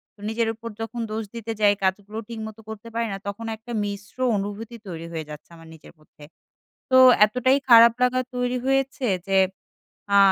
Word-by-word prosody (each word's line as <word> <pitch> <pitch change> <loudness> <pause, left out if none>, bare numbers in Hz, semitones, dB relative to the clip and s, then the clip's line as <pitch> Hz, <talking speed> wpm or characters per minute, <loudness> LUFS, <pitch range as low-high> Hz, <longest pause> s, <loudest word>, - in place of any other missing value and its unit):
তো - - -29
নিজের 225 +1 0
উপর 230 +1 -8
যখন 225 +2 -5
দোষ 220 +1 -3
দিতে 230 -1 -5
যাই 205 -1 +5
কাজগুলো 200 +3 -1
ঠিকমতো 220 -1 -8
করতে 220 +1 -8
পারি 230 0 0
না। - - -4
তখন 205 +3 -5
একটা 225 +3 -12
মিশ্র 200 +1 -7 0.2
অনুভূতি 205 +4 -5
তৈরি 165 -2 -7
হয়ে 160 -2 -5
যাচ্ছে 150 0 -11
আমার 165 0 -15
নিজের 160 - -16
মধ্যে। 155 -1 -19 0.7
তো 260 - +6 0.3
এতটাই 255 +5 +2
খারাপ 235 -1 +9
লাগা 250 0 +2 0.2
তৈরি 250 0 -1
হয়েছে। 270 0 0 0.2
যে 195 0 +2 0.8
আ - - +8
220 Hz, 175 wpm, -24 LUFS, 200-235 Hz, 0.8 s, খারাপ